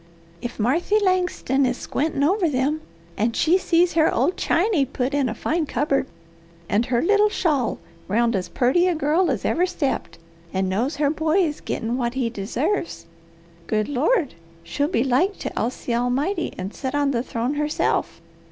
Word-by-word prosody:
"If 240 Hz, -, -6 dB
Marthy 330 Hz, -, +2 dB
Langston 360 Hz, -8 st, +1 dB
is 250 Hz, -1 st, +1 dB
squintin' 290 Hz, 0 st, -1 dB
over 360 Hz, +2 st, +2 dB
them 290 Hz, +3 st, 0 dB, 0.4 s
and 225 Hz, +3 st, 0 dB
she 345 Hz, +4 st, +3 dB
sees 345 Hz, -1 st, +2 dB
her 320 Hz, -1 st, +3 dB
old 285 Hz, +10 st, +1 dB
chany 350 Hz, -3 st, +2 dB
put 260 Hz, 0 st, -2 dB
in 280 Hz, -3 st, +1 dB
a 225 Hz, -, -4 dB
fine 320 Hz, -1 st, -1 dB
cupboard, 275 Hz, +1 st, 0 dB, 0.6 s
and 220 Hz, +6 st, +1 dB
her 245 Hz, -2 st, +1 dB
little 420 Hz, +3 st, +4 dB
shawl 300 Hz, -, 0 dB, 0.3 s
round 230 Hz, +3 st, +2 dB
as 180 Hz, -2 st, -2 dB
purty 270 Hz, +9 st, +2 dB
a 360 Hz, -, +1 dB
girl 320 Hz, +4 st, +2 dB
as 255 Hz, -7 st, -2 dB
ever 355 Hz, +2 st, +2 dB
stepped, 300 Hz, -, -2 dB, 0.3 s
and 190 Hz, 0 st, 0 dB
knows 235 Hz, -, -1 dB
her 290 Hz, -1 st, +1 dB
boy 320 Hz, +4 st, +2 dB
is 300 Hz, -3 st, -3 dB
gittin' 235 Hz, +1 st, -2 dB
what 240 Hz, 0 st, -1 dB
he 245 Hz, -3 st, -1 dB
deserves, 260 Hz, -, -2 dB, 0.6 s
good 215 Hz, -1 st, 0 dB
Lord, 290 Hz, -, +1 dB, 0.3 s
she'll 170 Hz, +13 st, -1 dB
be 300 Hz, -8 st, +1 dB
like 275 Hz, +10 st, +1 dB
to -, -, -5 dB
oust 245 Hz, -, -3 dB
the 240 Hz, -, -1 dB
Almighty, 270 Hz, +10 st, 0 dB
and 185 Hz, +3 st, -5 dB
set 265 Hz, 0 st, -4 dB
on 285 Hz, -1 st, +2 dB
the 235 Hz, -3 st, 0 dB
throne 245 Hz, +1 st, -2 dB
herself! 300 Hz, +1 st, -1 dB
280 Hz, 175 wpm, -23 LUFS, 245-335 Hz, 0.6 s, little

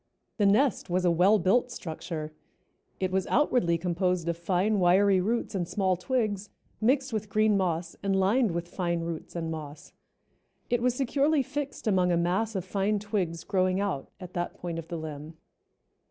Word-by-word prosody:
The 205 Hz, -3 st, +3 dB
nest 230 Hz, +5 st, +2 dB
was 180 Hz, +1 st, +1 dB
a 175 Hz, -, +4 dB
well 185 Hz, +6 st, +5 dB
built 210 Hz, +7 st, +2 dB
structure. 155 Hz, -5 st, -6 dB, 0.7 s
It 185 Hz, -1 st, -1 dB
was 190 Hz, 0 st, 0 dB
outwardly 245 Hz, -, +2 dB
composed 180 Hz, 0 st, -1 dB
of 170 Hz, -, 0 dB
fine, 185 Hz, +5 st, +1 dB
wiry 190 Hz, +2 st, +4 dB
roots 225 Hz, +3 st, -1 dB
and 180 Hz, -4 st, -2 dB
small 190 Hz, -1 st, +1 dB
twigs, 205 Hz, 0 st, -1 dB, 0.3 s
mixed 265 Hz, +2 st, +2 dB
with 215 Hz, -1 st, -3 dB
green 215 Hz, +1 st, +3 dB
moss 170 Hz, -3 st, -1 dB
and 195 Hz, -1 st, 0 dB
lined 215 Hz, +5 st, +3 dB
with 170 Hz, 0 st, -3 dB
fine 170 Hz, -2 st, -2 dB
roots 165 Hz, 0 st, -6 dB
and 165 Hz, -1 st, -3 dB
moss. 150 Hz, -2 st, -8 dB, 0.8 s
It 240 Hz, -1 st, +2 dB
was 250 Hz, 0 st, +2 dB
securely 280 Hz, +3 st, +2 dB
fixed 280 Hz, +2 st, -5 dB
among 185 Hz, -4 st, +3 dB
a 170 Hz, -, +3 dB
mass 190 Hz, +6 st, 0 dB
of 190 Hz, -2 st, -2 dB
fine 200 Hz, +2 st, 0 dB
twigs 195 Hz, -5 st, -2 dB
growing 185 Hz, 0 st, +1 dB
out 195 Hz, -9 st, -2 dB
at 180 Hz, -1 st, -9 dB
that 175 Hz, 0 st, -3 dB
point 170 Hz, -2 st, -5 dB
of 165 Hz, -, -8 dB
the 170 Hz, -, -4 dB
limb. 155 Hz, 0 st, -7 dB
185 Hz, 175 wpm, -28 LUFS, 170-215 Hz, 0.8 s, well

